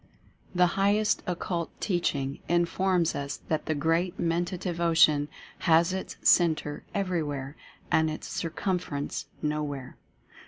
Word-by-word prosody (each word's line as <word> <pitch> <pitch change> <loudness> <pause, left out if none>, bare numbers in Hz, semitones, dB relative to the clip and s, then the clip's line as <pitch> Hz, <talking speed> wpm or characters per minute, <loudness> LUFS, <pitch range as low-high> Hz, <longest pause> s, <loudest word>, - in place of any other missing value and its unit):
The 180 0 +6 0.2
highest 210 +2 +3
Occult 175 -1 -3
Teaching 140 -8 -1
informs 175 0 +2
us 140 -1 -4
that 155 -1 -1
the 155 - +1
Great 165 +4 +1
Mentative 175 +1 -1
Ocean 160 -3 +4 0.3
has 165 +2 +4
its 190 - -5
centre 155 -4 +3
Everyzvhere 150 -8 -2 0.4
and 160 0 +4
its 155 - -5
circumference 165 -3 -3 0.2
No 150 0 0
where. 140 -4 -5
165 Hz, 115 wpm, -28 LUFS, 150-180 Hz, 0.4 s, The